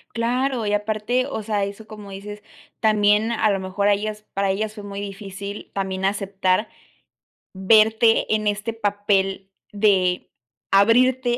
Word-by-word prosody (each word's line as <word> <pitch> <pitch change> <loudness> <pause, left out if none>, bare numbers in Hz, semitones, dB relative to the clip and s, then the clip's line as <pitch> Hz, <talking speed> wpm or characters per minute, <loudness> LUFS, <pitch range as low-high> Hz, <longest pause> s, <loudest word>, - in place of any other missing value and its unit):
Claro. 245 +1 0
Y 205 - -1
aparte, 215 +4 0
o 220 - -5
sea, 205 -2 -1
eso 200 +2 -9
como 210 -2 -10
dices, 205 +2 -8 0.4
también 215 +1 +3
a 220 -1 +2
lo 195 - 0
mejor 190 +2 -1
a - - +5
ellas 210 +1 -4
para 195 0 0
ellas 210 +2 -2
fue 210 -2 -10
muy 200 0 -6
difícil 200 0 -7
también 190 -1 -2
aceptar 195 0 0 0.8
verte 220 +4 +4
en 215 -1 0
este 210 +2 -2
papel 200 -3 -1 0.2
de 195 -4 +1 0.4
abrirte 240 +4 +4
205 Hz, 140 wpm, -22 LUFS, 195-220 Hz, 0.8 s, a